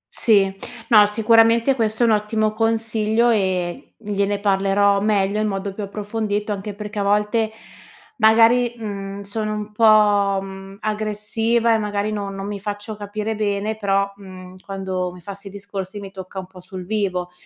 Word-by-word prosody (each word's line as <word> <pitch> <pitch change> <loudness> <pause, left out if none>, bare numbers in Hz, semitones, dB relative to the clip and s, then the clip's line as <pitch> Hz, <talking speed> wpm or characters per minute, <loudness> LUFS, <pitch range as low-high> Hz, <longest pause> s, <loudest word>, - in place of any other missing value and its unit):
Sì. 195 -4 +3 0.3
No, 210 -3 +7
sicuramente 230 +3 +4
questo 220 -1 0
è - - +6
un 225 - +4
ottimo 215 0 +1
consiglio 225 +1 +1
e 190 - -1
gliene 205 -1 -1
parlerò 200 0 +2
meglio, 205 -1 +1
in 215 - +1
modo 195 -1 -3
più 210 - -7
approfondito, 210 +1 -3
anche 205 0 -4
perché 210 0 -6
a - - +1
volte, 210 +2 +1 0.7
magari, 230 +2 +5
mhmm, 200 -2 -6
sono 215 +1 -3
un 210 0 -5
po', 210 -2 +4
mhmm, 195 0 -9
aggressiva 215 +2 0
e 220 - +2
magari 210 0 -2
no 200 -2 -3
non 195 0 -6
mi 205 0 -4
faccio 205 +2 -5
capire 210 +1 -4
bene. 210 0 -1
Però, 200 -1 0
mhmm, 185 -2 -12
quando 190 -2 -3
mi 180 - -12
fa 190 +4 -8
'sti 200 +1 -11
discorsi 200 0 -7
mi 195 -1 -8
tocca 190 0 -10
un 190 - -4
po' 185 0 -14
sul 185 0 -8
vivo. 185 -3 -2
205 Hz, 165 wpm, -21 LUFS, 195-215 Hz, 0.7 s, No